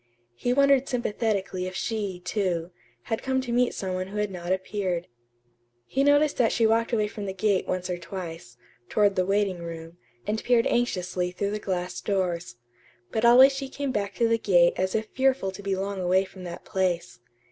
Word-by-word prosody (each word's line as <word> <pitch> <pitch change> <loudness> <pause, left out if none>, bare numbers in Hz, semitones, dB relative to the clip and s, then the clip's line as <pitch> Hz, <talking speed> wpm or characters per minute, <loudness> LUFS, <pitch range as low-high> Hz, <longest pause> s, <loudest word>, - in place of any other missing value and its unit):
He 245 - -1
wondered 275 0 +4
sympathetically 205 -6 -1
if 185 - -7
she, 205 -5 -3
too, 180 -3 -1 0.3
had 225 - -3
come 265 0 0
to 250 -2 -5
meet 245 +1 +2
some 190 -1 -3
one 185 0 -2
who 205 +2 -7
had 210 -1 -1
not 175 -1 -5
appeared. 185 -2 -1 0.8
He 270 - 0
noticed 290 +1 +4
that 235 - +3
she 230 - +2
walked 230 +2 +2
away 215 -3 +1
from 205 -1 -6
the 190 - -4
gate 195 -1 +1
once 185 0 -2
or 180 -1 -3
twice, 170 -8 -8 0.3
toward 205 -2 +3
the 185 0 +1
waiting 195 -2 +1
room, 165 0 -8 0.3
and 215 +1 -2
peered 240 -2 +3
anxiously 180 -6 0
through 200 +3 -2
the 210 - -2
glass 180 -3 -3
doors; 175 - -1 0.6
but 220 - -1
always 255 +3 +8
she 270 0 -5
came 280 0 -3
back 205 -4 -2
to 235 - +2
the 230 0 +2
gate 175 -5 +4
as 185 0 -1
if 220 0 0
fearful 260 -7 +1
to 190 - -9
be 195 -1 -1
long 195 +1 -3
away 185 +2 +3
from 185 -1 -11
that 175 -1 -8
place. 180 - -1
195 Hz, 195 wpm, -26 LUFS, 180-230 Hz, 0.8 s, always